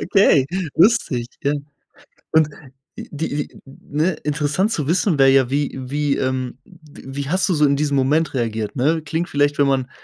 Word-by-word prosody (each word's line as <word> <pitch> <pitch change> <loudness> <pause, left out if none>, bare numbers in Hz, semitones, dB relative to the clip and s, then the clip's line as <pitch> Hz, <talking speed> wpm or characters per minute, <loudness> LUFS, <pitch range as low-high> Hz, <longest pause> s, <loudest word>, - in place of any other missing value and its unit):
okay, 195 -9 +4 0.3
lustig, 165 - +2
ja. 140 - +1 0.8
Und 160 -1 +4 0.5
die - - -8
die 150 -1 -4
ne 150 +6 -2
interessant 150 +7 0
zu 150 -4 -2
wissen 170 -1 +1
wäre 135 0 +6
ja 135 -2 +3
wie 145 0 0
wie, 145 +2 -1
ähm 130 -1 -2
w 160 -5 -17 0.2
wie - - -7
hast 185 +4 +1
du 180 - +1
so 150 - +3
in 140 -1 +4
diesem 145 0 0
Moment 145 +5 +1
reagiert, 110 -3 -2
ne? 155 +5 +1
Klingt 160 +3 -3
vielleicht, 145 +1 +1
wenn 145 - +4
man 130 -2 0
145 Hz, 175 wpm, -20 LUFS, 135-160 Hz, 0.8 s, wäre